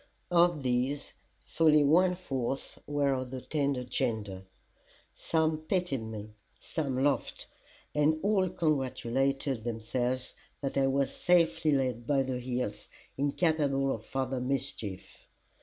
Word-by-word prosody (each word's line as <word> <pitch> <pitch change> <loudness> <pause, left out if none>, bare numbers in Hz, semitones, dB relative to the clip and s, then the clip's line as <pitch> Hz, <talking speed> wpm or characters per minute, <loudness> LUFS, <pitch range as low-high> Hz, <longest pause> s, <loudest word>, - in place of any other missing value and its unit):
Of 170 -4 +4
these, 130 +3 -1 0.3
fully 155 -2 +4
one 180 +5 +4
fourth 135 -7 -3
were 145 -1 +1
of 130 -1 -3
the 130 0 -5
tender 140 -2 -1
gender; 105 -6 -2 0.7
some 160 -1 0
pitied 165 -4 -1
me, 110 -1 -7 0.3
some 135 -5 -2
laughed, 140 -3 0 0.5
and 150 +1 +3
all 195 -2 +3
congratulated 135 -4 0
themselves 120 +2 -2 0.3
that 135 -1 -3
I 135 -1 +3
was 135 0 +1
safely 170 -3 +3
laid 125 -4 0
by 140 -2 +3
the 130 -1 -3
heels, 120 -4 -3 0.3
incapable 140 -2 +1
of 110 - -6
farther 130 +1 -2
mischief. 120 -7 -4
135 Hz, 120 wpm, -30 LUFS, 125-150 Hz, 0.7 s, Of